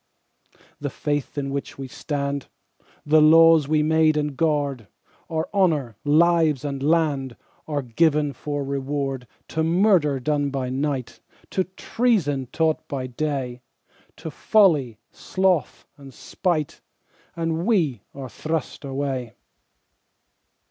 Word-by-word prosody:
The - - -3
Faith 145 -1 -3
in 140 -1 -2
which 140 0 -5
we 135 -1 -6
stand, 140 +1 -3 0.6
The 155 +1 +5
laws 165 -1 +6
we 155 0 +2
made 160 0 +3
and 150 -2 -1
guard, 145 -7 0 0.4
Our 160 -1 -2
honour, 155 - +1
lives, 155 -2 +3
and 140 -2 -3
land 145 -4 +1 0.3
Are 145 -3 -2
given 150 +3 +1
for 145 +3 -4
reward 135 -2 -3 0.2
To 160 - -1
Murder 165 -5 +3
done 145 +2 0
by 130 -2 -3
night, 135 -2 -3 0.3
To 185 - 0
Treason 185 - 0
taught 160 -1 0
by 135 -2 -4
day, 130 -2 -3 0.6
To 160 -1 -7
folly, 150 - +3
sloth, 185 -6 -1
and 140 -2 -12
spite, 160 0 -2 0.5
And 165 +2 -2
we 160 - +1
are 135 -2 -6
thrust 160 +5 -4
away. 135 -3 -3
145 Hz, 120 wpm, -23 LUFS, 135-160 Hz, 0.6 s, laws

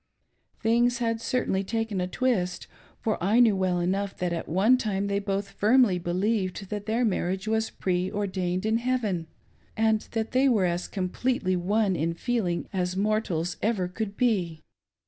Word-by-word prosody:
Things 240 +2 +2
had 230 -2 -1
certainly 230 -6 0
taken 225 -1 -2
a 180 - -1
twist, 185 -5 -1 0.4
for 215 -6 -1
I 210 +6 +3
know 230 -4 +6
well 185 -2 +1
enough 195 +3 -1
that 180 -1 -1
at 170 - -4
one 195 +9 +4
time 205 -5 -1
they 200 0 0
both 200 0 -3
firmly 215 -4 +3
believed 190 +2 -1
that 205 0 -4
their 230 +3 +1
marriage 190 -2 -1
w^s 220 0 0
preordained 185 0 -1
in 220 +1 +2
heaven, 230 -9 -1 0.5
and 220 -1 +3
that 225 -1 -2
they 265 +2 +4
were 215 -7 +3
as 175 0 -1
completely 190 +1 -1
one 195 +2 +1
in 165 +1 -1
feeling 200 -5 -1
as 180 -1 -1
rtiortals 195 -5 0
ever 205 -4 0
could 200 +2 -5
be. 185 -10 0
200 Hz, 160 wpm, -27 LUFS, 180-225 Hz, 0.5 s, know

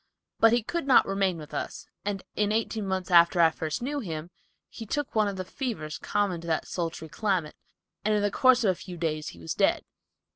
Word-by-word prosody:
But 225 - +6
he 235 -1 +2
could 335 +4 -3
not 260 - +6
remain 195 -2 0
with 150 -2 -10
us, 145 - -4 0.2
and 200 -1 -3
in 210 0 +1
eighteen 220 -1 -1
months 185 -1 -2
after 170 +1 +6
I 165 -1 +6
first 160 +6 -4
knew 290 +3 -2
him, 165 - -5 0.4
he 225 - -9
took 290 +5 -2
one 215 -2 +3
of 200 - -3
the 185 - -4
fevers 180 - -4
common 200 -5 -1
to 170 - -9
that 160 -1 0
sultry 165 -2 -4
climate, 185 -4 -1 0.5
and 215 0 +2
in 205 - +1
the 205 - +1
course 255 +1 +4
of 200 - +4
a 180 - -7
few 180 -2 -8
days 155 -2 -2
he 85 - -8
was 80 -1 -4
dead. - - +2
195 Hz, 220 wpm, -27 LUFS, 165-220 Hz, 0.5 s, But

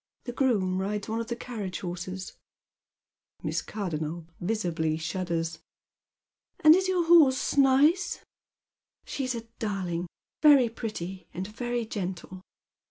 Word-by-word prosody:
The 245 - -5
groom 205 -8 +1
rides 205 +1 -2
one 225 +1 -1
of 230 - -6
the 235 - -2
carriage 215 -7 -5
horses." 185 +1 -5 1.1
jVIiss - - -1
Cardonnel 170 -5 -4
visibly 175 -6 -1
shuddera. 165 -1 -2 0.5
" - - -55
And 310 +1 +9
is 375 +1 +1
your 365 -2 +1
horse 310 -6 +5
nice? 285 +6 +3 0.2
" - - -65
" - - -66
She's 255 -3 -2
a 230 - -5 0.2
darling, 185 -5 -2 0.3
very 285 -6 +7
pretty, 195 -5 -6
and 185 +2 -3
very 240 +3 -3
gentle." 185 -3 -5
210 Hz, 130 wpm, -28 LUFS, 180-255 Hz, 1.1 s, And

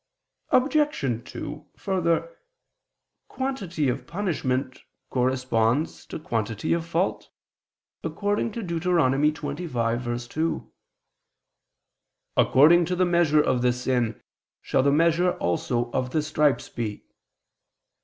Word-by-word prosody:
Obj. 255 - +1
2: 150 +1 -7
Further, 190 - 0 0.9
quantity 205 - -2
of 125 - -2
punishment 135 -9 -2 0.3
corresponds 130 +1 0
to - - -5
quantity 115 -6 -2
of 165 -1 -2
fault, 170 +3 -1 0.7
according 205 +2 -1
to 230 - -4
Deut. 170 -3 -3
25:2: 140 -4 0 1.6
"According 165 +6 +6
to 180 +2 -1
the 185 +1 +3
measure 170 -4 +4
of 130 -1 +1
the 125 0 +3
sin 125 -2 -1 0.4
shall - - +1
the 140 +1 +3
measure 170 +4 +3
also 120 +7 -1
of 130 0 -1
the 155 +3 0
stripes 150 -2 +1
be." 110 -3 -5
150 Hz, 100 wpm, -25 LUFS, 125-175 Hz, 1.6 s, According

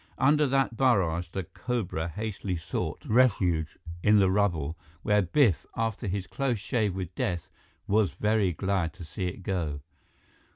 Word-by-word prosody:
Under 150 +2 +4
that 135 -2 +1
barrage, 95 -10 +2
the 95 +2 -4
cobra 95 -5 -3
hastily 100 0 -3
sought 80 0 -4
refuge 95 -10 +2 0.2
in 105 +2 +5
the 95 -2 +4
rubble, 85 -7 +1 0.3
where 105 0 +3
Biff, 100 - +3
after 115 -1 -1
his 95 0 -2
close 135 0 -1
shave 105 -2 -1
with 95 -3 -5
death, 85 -3 -2 0.3
was 105 -1 +3
very 105 -3 +1
glad 95 -1 -1
to 90 - -10
see 90 +4 -3
it 95 +2 -6
go. 80 -7 -2
95 Hz, 150 wpm, -28 LUFS, 85-110 Hz, 0.3 s, in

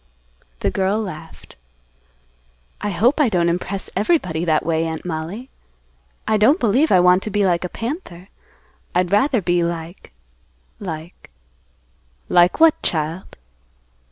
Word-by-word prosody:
The - - 0
girl 195 +2 0
laughed. 165 -6 -9 1.2
"I 210 - -2
hope 235 - +2
I 275 - +3
don't 175 -4 +1
impress 180 +3 -3
everybody 185 - 0
that 155 -2 +1
way, 165 0 0
Aunt 160 +1 -6
Mollie. 175 +9 -5 0.8
I 215 - +2
don't 255 - +4
believe 255 +8 +2
I 185 - +6
want 180 +1 +5
to 215 - -5
be 205 -1 +1
like 175 -2 +1
a 180 - -3
panther. 225 - -6 0.7
I'd 180 0 +1
rather 225 +2 +2
be 175 0 +1
like—like—" 160 - -9 1.0
"Like 175 +6 +4
what, 325 -1 +5
child?" 160 +2 -3
180 Hz, 130 wpm, -20 LUFS, 165-210 Hz, 1.2 s, I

